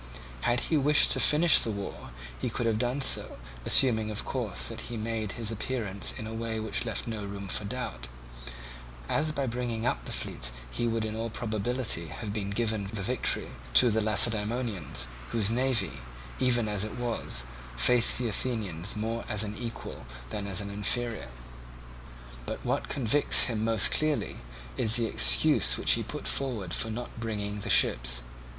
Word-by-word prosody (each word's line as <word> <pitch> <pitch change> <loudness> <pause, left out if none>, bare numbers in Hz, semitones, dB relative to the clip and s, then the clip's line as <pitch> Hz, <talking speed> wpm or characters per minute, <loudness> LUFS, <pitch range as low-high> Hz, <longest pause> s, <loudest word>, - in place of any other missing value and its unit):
Had 120 0 +2
he 160 - +1
wished 150 +1 +4
to - - +1
finish 160 +3 +5
the - - -2
war, 100 -2 -6 0.3
he - - -1
could 120 - -2
have 110 -1 +1
done 125 +3 -1
so, - - +1 0.3
assuming 110 -5 +5
of 105 0 -4
course 120 -7 -2
that 115 +1 -6
he 120 - -4
made 110 -1 -3
his 115 -2 -2
appearance 110 -3 -3
in 110 - -6
a 110 - -6
way 115 0 -3
which 110 +2 -2
left 110 - -2
no 110 -3 -4
room 100 0 -6
for 105 - -2
doubt; 100 - -5 1.0
as 155 - +1
by 140 -2 -2
bringing 120 -2 -3
up - - 0
the - - -6
fleet - - -2 0.2
he 120 - -1
would 115 -1 -1
in 110 0 -4
all 115 +1 -3
probability 110 -4 -2
have 105 +5 -6 0.2
given 110 -4 -1
the 100 -3 -4
victory 125 +4 +1 0.3
to 120 - +7
the 110 +1 +1
Lacedaemonians, 105 - +2 0.2
whose 110 -2 +1
navy, 125 - 0 0.4
even 120 -3 +2
as 105 -2 -1
it 110 - -6
was, 115 - -2 0.3
faced 120 - +5
the 125 - -1
Athenian 105 -7 -2
more 115 +2 -3
as 105 0 +2
an 105 0 -5
equal 115 - -7 0.2
than 100 -1 -4
as 100 +1 -2
an 100 0 -6
inferior. 115 - -1 1.2
But - - -5
what - - -1
convicts 140 +2 +3
him 110 -3 -1
most 115 -3 +3
clearly, 155 -1 +1 0.4
is 110 +1 +4
the 120 -2 +3
excuse - - +5
which - - +3
he - - +4
put - - -6
forward 115 -10 -2
for 115 - -1
not 115 +1 -6
bringing 105 -2 -4
the - - -5
ships. - - +3
110 Hz, 170 wpm, -28 LUFS, 100-120 Hz, 1.2 s, to